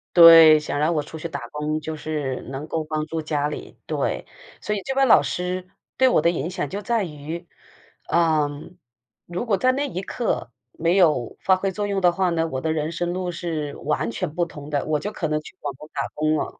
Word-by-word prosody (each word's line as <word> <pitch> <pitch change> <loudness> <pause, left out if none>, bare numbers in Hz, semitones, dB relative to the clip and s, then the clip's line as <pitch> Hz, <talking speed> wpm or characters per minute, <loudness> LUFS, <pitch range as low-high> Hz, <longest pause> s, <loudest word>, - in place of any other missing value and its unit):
对， 165 -2 +10
想 145 -1 -3
让 155 +3 +2
我 150 - 0
出 160 - -9
去 170 - -4
打 - - -6
工， 150 +1 -2
就 155 +1 -5
是 150 -4 -3
能 140 +3 -6
够 160 0 -2
帮 155 0 -2
助 165 0 -3
家 150 -2 -1
里， 150 - -7
对。 - - -2 0.4
所 210 - -1
以 200 - -3
这 270 +5 -3
位 270 0 +4
老 235 - +7
师 180 +1 -3 0.3
对 260 - +4
我 155 - +3
的 170 - +3
影 165 0 -3
响 145 -6 -3
就 200 +5 -4
在 235 -3 0
于， 160 +2 -7 0.6
嗯， 155 0 +1 0.5
如 180 +8 -4
果 205 -4 +2
在 255 0 +3
那 285 +2 -1
一 185 -7 -4
刻 210 - -2 0.2
没 170 +3 0
有 155 -10 +3
发 190 +1 +5
挥 190 +1 -1
作 205 +2 -3
用 195 -1 -1
的 175 - +5
话 185 +1 +1
呢， 165 -1 0
我 130 -4 -4
的 160 +2 0
人 155 +1 -2
生 175 +1 -2
路 180 -1 -2
是 160 -4 -4
完 115 - -1
全 125 +5 -3
不 175 +1 +1
同 150 -3 -10
的， 145 -2 0
我 150 -1 0
就 210 - -4
可 165 -6 -3
能 155 0 0
去 - - -13
广 145 -2 -4
东 150 +3 -12
打 140 - -1
工 155 +1 +1
了。 - - -4
160 Hz, 245 characters per minute, -23 LUFS, 150-180 Hz, 0.6 s, 对